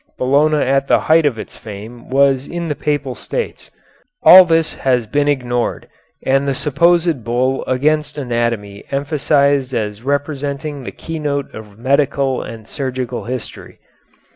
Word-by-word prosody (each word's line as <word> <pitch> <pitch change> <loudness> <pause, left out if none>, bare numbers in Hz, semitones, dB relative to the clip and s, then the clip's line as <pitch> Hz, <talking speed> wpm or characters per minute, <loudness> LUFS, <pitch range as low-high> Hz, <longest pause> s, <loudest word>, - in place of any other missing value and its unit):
Bologna 145 +4 +2
at 135 -1 +1
the - - +4
height 160 -1 +4
of 125 -6 -1
its - - -9
fame 110 +3 -10
was 135 0 +2
in 170 -1 -4
the 150 - -1
Papal 145 -3 -2
States. 475 - -5 0.5
All 185 0 +10
this 165 -2 +1
has 125 -3 0
been 145 +6 0
ignored 125 -4 -1 0.4
and 135 +1 +2
the 135 - 0
supposed 165 0 +2
bull 125 +3 0
against 150 +4 0
anatomy 115 -6 -2
emphasized 140 -2 +1
as 105 -1 -3
representing 145 +1 -3
the - - -5
keynote 150 -3 -4
of 105 -2 -11
medical 135 +1 +1
and 110 -2 -9
surgical 130 -3 -4
history. 125 0 -7
135 Hz, 140 wpm, -17 LUFS, 125-145 Hz, 0.5 s, All